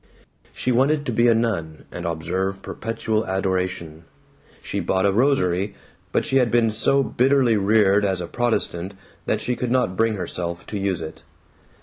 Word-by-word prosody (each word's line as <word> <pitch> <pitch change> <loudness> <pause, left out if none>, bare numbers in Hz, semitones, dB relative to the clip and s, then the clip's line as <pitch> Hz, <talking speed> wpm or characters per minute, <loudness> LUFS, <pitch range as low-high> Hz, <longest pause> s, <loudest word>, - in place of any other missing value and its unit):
She 125 - -2
wanted 145 +4 +2
to 125 - -1
be 120 +2 +3
a 115 - +5
nun 90 -9 -2
and 90 -1 -5
observe 95 +4 -2
perpetual 110 -1 -2
adoration. 90 -4 -2 0.6
She - - -3
bought 95 0 0
a 100 - +4
rosary, 100 -5 +1 0.4
but - - +1
she 135 - +2
had 125 -3 +3
been 115 -2 +3
so 135 +6 +3
bitterly 130 -2 +3
reared 105 0 +3
as 95 -2 0
a 90 - -3
Protestant 100 -4 -1 0.3
that - - +1
she 125 - -1
could 125 0 -3
not 120 -7 +1
bring 115 +2 +1
herself 90 -2 -4
to 105 - -3
use 95 -3 -1
it. 80 - -8
100 Hz, 165 wpm, -22 LUFS, 90-120 Hz, 0.6 s, a